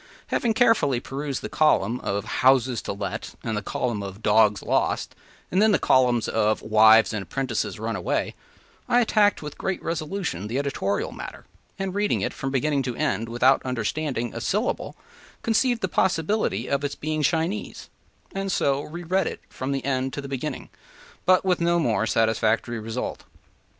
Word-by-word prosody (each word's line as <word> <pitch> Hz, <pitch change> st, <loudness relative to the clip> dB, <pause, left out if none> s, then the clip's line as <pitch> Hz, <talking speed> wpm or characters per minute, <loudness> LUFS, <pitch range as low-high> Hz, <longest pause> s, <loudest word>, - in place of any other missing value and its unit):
Having 230 Hz, -2 st, +1 dB
carefully 225 Hz, -, +3 dB
perused 140 Hz, +2 st, -4 dB
the -, -, -2 dB
column 125 Hz, -7 st, +2 dB
of 100 Hz, 0 st, -2 dB
“houses 130 Hz, -2 st, +3 dB
to -, -, -4 dB
let,” 100 Hz, 0 st, -5 dB
and 110 Hz, -, -2 dB
the 105 Hz, -, -1 dB
column 110 Hz, +1 st, -2 dB
of 100 Hz, +2 st, -8 dB
“dogs 105 Hz, -1 st, +4 dB
lost,” -, -, 0 dB, 0.4 s
and 185 Hz, -, +3 dB
then 220 Hz, 0 st, +5 dB
the -, -, +5 dB
two -, -, -16 dB
columns 125 Hz, -3 st, +4 dB
of 110 Hz, -1 st, +1 dB
“wives 110 Hz, +1 st, +6 dB
and 105 Hz, -, -2 dB
apprentices 130 Hz, +3 st, -3 dB
runaway,” 110 Hz, -5 st, -2 dB, 0.6 s
I 245 Hz, -, +5 dB
attacked 210 Hz, -5 st, +3 dB
with 150 Hz, -1 st, -8 dB
great 190 Hz, -1 st, -2 dB
resolution 160 Hz, -, -3 dB
the 120 Hz, +4 st, -2 dB
editorial 135 Hz, -8 st, -1 dB
matter, -, -, -9 dB, 0.3 s
and, 195 Hz, -1 st, -3 dB
reading 205 Hz, +1 st, +1 dB
it -, -, -2 dB
from 135 Hz, -, -4 dB
beginning 140 Hz, +1 st, +1 dB
to 125 Hz, -3 st, -3 dB
end 115 Hz, 0 st, -1 dB
without 125 Hz, +3 st, +3 dB
understanding 125 Hz, 0 st, -2 dB
a -, -, -5 dB
syllable, -, -, -1 dB, 0.5 s
conceived 230 Hz, +1 st, +2 dB
the 190 Hz, -, +1 dB
possibility 185 Hz, +3 st, 0 dB
of 140 Hz, 0 st, 0 dB
its 145 Hz, -, -2 dB
being 155 Hz, 0 st, -2 dB
Chinese, 165 Hz, +7 st, -1 dB, 0.5 s
and 195 Hz, 0 st, -2 dB
so 140 Hz, -4 st, +1 dB
re 170 Hz, +4 st, -8 dB
read 185 Hz, +1 st, +1 dB
it -, -, -6 dB
from 130 Hz, +1 st, -4 dB
the 135 Hz, -1 st, -2 dB
end 130 Hz, -1 st, -1 dB
to 145 Hz, -, -4 dB
the 140 Hz, -, -7 dB
beginning, 135 Hz, -2 st, -4 dB, 0.6 s
but 185 Hz, 0 st, +5 dB
with 180 Hz, -2 st, +1 dB
no 170 Hz, 0 st, +3 dB
more 110 Hz, -9 st, +1 dB
satisfactory 115 Hz, +1 st, +1 dB
result. 115 Hz, +3 st, -4 dB
135 Hz, 170 wpm, -25 LUFS, 115-170 Hz, 0.6 s, wives